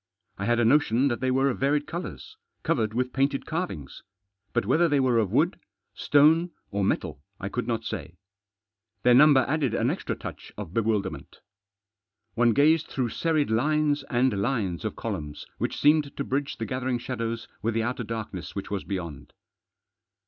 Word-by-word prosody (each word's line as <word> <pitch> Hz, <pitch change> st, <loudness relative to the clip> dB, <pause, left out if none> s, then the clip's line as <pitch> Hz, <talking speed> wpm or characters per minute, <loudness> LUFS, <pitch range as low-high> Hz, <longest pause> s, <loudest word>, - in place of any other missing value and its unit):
I 100 Hz, -, -2 dB
had 120 Hz, +1 st, +2 dB
a 120 Hz, -, +3 dB
notion 135 Hz, 0 st, +3 dB
that 120 Hz, -, -2 dB
they 130 Hz, 0 st, 0 dB
were 135 Hz, +2 st, +3 dB
of -, -, -6 dB
varied 145 Hz, +2 st, +1 dB
colours; 180 Hz, -, -7 dB, 0.3 s
covered 115 Hz, -9 st, 0 dB
with 125 Hz, +1 st, -1 dB
painted 135 Hz, +1 st, 0 dB
carvings. 160 Hz, -, -4 dB, 0.5 s
But -, -, 0 dB
whether 160 Hz, +10 st, +3 dB
they 145 Hz, -1 st, +3 dB
were 125 Hz, -3 st, +3 dB
of 105 Hz, -4 st, 0 dB
wood, 155 Hz, -, +2 dB, 0.3 s
stone, 160 Hz, +4 st, +4 dB, 0.2 s
or 100 Hz, 0 st, -1 dB
metal 85 Hz, -, -1 dB, 0.2 s
I 100 Hz, -, -4 dB
could 125 Hz, +2 st, -3 dB
not 115 Hz, -2 st, -2 dB
say. 85 Hz, -, -5 dB, 0.9 s
Their 125 Hz, -, +6 dB
number 135 Hz, 0 st, +7 dB
added 140 Hz, -4 st, 0 dB
an -, -, +1 dB
extra -, -, -3 dB
touch -, -, -9 dB
of 80 Hz, -, -7 dB
bewilderment. 105 Hz, -4 st, -2 dB, 0.9 s
One 120 Hz, 0 st, +3 dB
gazed 155 Hz, +5 st, +4 dB
through 125 Hz, -3 st, -2 dB
serried 155 Hz, -2 st, 0 dB
lines 150 Hz, +4 st, +2 dB
and 125 Hz, 0 st, +2 dB
lines 100 Hz, -6 st, -1 dB
of 110 Hz, -, -3 dB
columns 80 Hz, -10 st, -5 dB
which -, -, -2 dB
seemed 150 Hz, -1 st, +3 dB
to 140 Hz, -, -1 dB
bridge 140 Hz, +1 st, -2 dB
the 115 Hz, -, -3 dB
gathering 130 Hz, +2 st, -1 dB
shadows 115 Hz, -2 st, -4 dB
with 110 Hz, +2 st, -1 dB
the 115 Hz, -, +1 dB
outer 120 Hz, +1 st, -2 dB
darkness 105 Hz, -7 st, -6 dB
which 100 Hz, -, -5 dB
was 100 Hz, -2 st, -2 dB
beyond. 80 Hz, -7 st, -6 dB
125 Hz, 170 wpm, -26 LUFS, 110-145 Hz, 0.9 s, number